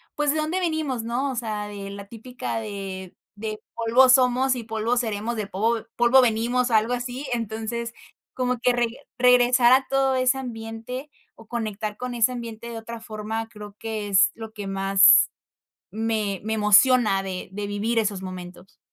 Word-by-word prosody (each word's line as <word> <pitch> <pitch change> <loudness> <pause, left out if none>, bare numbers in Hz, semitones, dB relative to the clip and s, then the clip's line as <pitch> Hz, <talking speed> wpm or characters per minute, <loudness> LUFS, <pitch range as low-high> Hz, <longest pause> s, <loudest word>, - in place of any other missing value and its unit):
pues, 295 -1 +1
¿de 310 - -1
dónde 315 +4 -1
venimos?, 310 -8 -1
¿no?, 245 +4 -1
o - - -5
sea, 215 -3 -3
de 200 -1 -7
la 200 0 -8
típica 235 +1 -5
de 195 -3 -7 0.2
de 215 0 -5
polvo 235 +3 +4
somos 255 0 +4
y 240 - -5
polvo 225 +2 -1
seremos, 225 0 -2
de 210 -2 -3
povo 220 +4 0 0.2
polvo 240 +2 +6
venimos, 245 +1 +1
algo 220 +2 +3
así, 245 +3 -4
entonces, 230 +1 -4 0.4
como 250 -1 -1
que 250 +1 +2
reg 240 -1 +1 0.3
regresar 250 0 +5
a 265 +1 +3
todo 270 -1 +2
ese 255 +1 +2
ambiente 240 +2 -6 0.3
o 225 - -16
conectar 215 -2 -4
con 250 0 -5
ese 235 +2 +2
ambiente 235 -1 -7
de 230 - -6
otra 230 +1 -7
forma 220 +1 -5
creo 210 -2 -11
que 220 -2 -4
es 190 -2 +5
lo 225 -1 -8
que 205 -2 -6
más 195 0 +5 0.6
me 215 -3 -1
me 220 +1 -2
emociona 210 -1 +4
de 185 -2 -6
de 205 +1 -4
vivir 215 +3 0
esos 205 -3 -1
momentos. 185 0 -9
225 Hz, 170 wpm, -24 LUFS, 210-250 Hz, 0.6 s, polvo